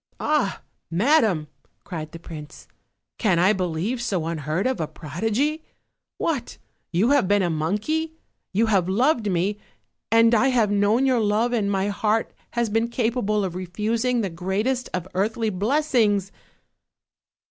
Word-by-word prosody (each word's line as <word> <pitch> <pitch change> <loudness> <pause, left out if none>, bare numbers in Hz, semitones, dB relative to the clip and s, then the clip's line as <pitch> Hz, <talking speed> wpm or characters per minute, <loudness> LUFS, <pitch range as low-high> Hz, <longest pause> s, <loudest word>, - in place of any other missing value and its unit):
"Ah, 300 -10 0 0.3
madam!" 195 - +2 0.4
cried 155 -4 -6
the - - -8
prince, 155 -3 -10 0.5
"can 190 -7 +2
I 185 +5 +4
believe 185 +6 -2
so 190 -9 -1
un 165 -1 -3
heard 155 +6 -2
of 255 -6 0
a 155 - -1
prodigy? 225 - -2 0.5
What! 285 -7 -2 0.3
you 195 +10 +2
have 285 -9 +3
been 205 0 +3
a 175 - 0
monkey; 210 - -1 0.4
you 215 +4 +2
have 195 -5 +2
loved 235 +1 +2
me, 190 +3 0 0.5
and 230 +1 +5
I 235 +4 +4
have 235 -6 +2
known 205 +5 +3
your 255 -3 +3
love 220 +3 +1
and 210 -4 +1
my 195 0 0
heart 215 +2 0 0.2
has 235 -1 +1
been 225 +2 +1
capable 225 -3 0
of 180 - -4
refusing 220 +7 -1
the 195 -4 -2
greatest 205 +9 -1
of 180 0 -3
earthly 220 +4 0
blessings!" 210 -2 +1
210 Hz, 145 wpm, -24 LUFS, 185-240 Hz, 0.5 s, and